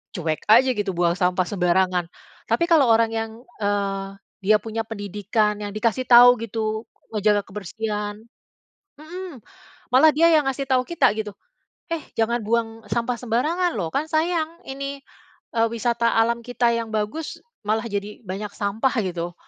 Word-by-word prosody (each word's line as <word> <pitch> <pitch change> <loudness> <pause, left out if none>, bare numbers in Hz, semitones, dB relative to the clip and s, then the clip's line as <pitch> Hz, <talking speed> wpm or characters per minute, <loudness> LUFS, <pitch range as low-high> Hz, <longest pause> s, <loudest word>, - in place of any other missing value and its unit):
cuek 160 -3 -2
aja 240 +5 +6
gitu 205 -5 -2
buang 175 0 +2
sampah 180 0 +2
sembarangan. 180 -1 +1 0.4
Tapi 340 - +1
kalau 290 -6 +6
orang 225 0 +4
yang 225 0 -2 0.3
eee, 200 -1 -1 0.4
dia 215 +3 +5
punya 225 0 -4
pendidikan 210 0 -1
yang 205 -1 -5
dikasih 230 +3 0
tahu 245 0 +8
gitu, 220 0 -3 0.3
ngejaga 210 -1 +2
kebersihan 210 +1 -4 0.8
mhm, 330 - -9 0.5
malah 270 +5 +7
dia 335 +3 +5
yang 305 -3 +4
ngasih 270 +1 -2
tahu 255 -1 +4
kita 340 -9 +3
gitu, 210 -2 -4 0.6
"eh 330 - -1 0.2
jangan 235 +2 +1
buang 225 0 -1
sampah 235 +1 0
sembarangan 305 +10 0
loh. 175 -5 -2
Kan 280 - -1
sayang, 330 +1 0
ini 275 +1 -5 0.6
eee, 225 0 +3
wisata 235 0 +1
alam 235 +1 +1
kita 245 0 +1
yang 230 -1 -4
bagus, 215 +9 -3 0.2
malah 220 +2 0
jadi 205 0 -5
banyak 200 +2 -5
sampah" 215 +7 -1 0.2
gitu. 175 0 -4
225 Hz, 150 wpm, -23 LUFS, 205-250 Hz, 0.8 s, tahu